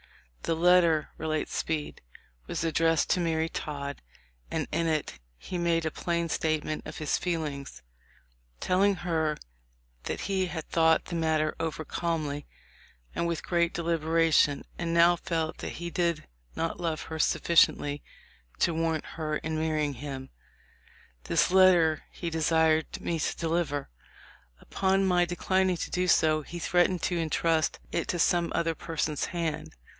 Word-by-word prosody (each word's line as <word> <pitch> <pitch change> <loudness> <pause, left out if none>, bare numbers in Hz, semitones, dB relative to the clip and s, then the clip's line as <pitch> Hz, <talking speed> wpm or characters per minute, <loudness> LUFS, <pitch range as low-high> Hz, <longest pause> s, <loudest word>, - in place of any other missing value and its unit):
"The 165 - 0
letter," 170 -2 +4
relates 155 -1 -2
Speed, 155 -2 -3 0.5
"was - - -3
addressed 165 0 +2
to - - +3
Mary 165 -2 0
Todd, 140 -3 -5 0.5
and - - -2
in 165 - 0
it 155 - -2 0.2
he 180 - -5
made 170 -1 +1
a 160 - 0
plain 170 +1 -1
statement 155 -1 -1
of - - -7
his 155 -2 0
feelings, 145 - -4 0.8
telling 195 +2 +2
her 160 -3 -1 0.7
that - - -3
he 190 -1 0
had 160 -3 -6
thought 160 -1 +3
the 170 - -5
matter 160 -2 +1
over 160 -1 -3
calmly 150 -3 -2 0.7
and 170 - -1
with 170 -2 -3
great 170 -1 +1
deliberation, 165 -3 +2
and 170 -1 -2
now 170 +1 +6
felt 165 -2 -3
that - - -5
he 175 0 -6
did 170 -3 -1 0.3
not 165 - -2
love 165 -2 -2
her 160 -1 -6
sufficiently 145 -3 +3 0.6
to 170 - +2
warrant 160 -1 -1
her 155 -1 -1
in 155 +1 -3
marrying 155 -2 0
him. 135 0 -7 0.9
This - - +2
letter 180 -4 +5
he 170 -2 -5
de 160 0 -2
sired 160 0 +2
me 165 -1 -2
to - - -1
deliver. 165 -4 -1 0.7
Upon 195 0 +1
my 180 -2 +3
declining 185 +1 +1
to - - -4
do 180 0 0
so 155 -3 +4
he 170 +4 -8
threatened 175 +1 +2
to 175 -2 0
intrust 160 0 +1
it 170 - -1
to 175 - -1
some 170 0 +2
other 165 -1 +1
person's 155 -2 -2
hand. 165 -3 -3
165 Hz, 150 wpm, -28 LUFS, 155-170 Hz, 0.9 s, now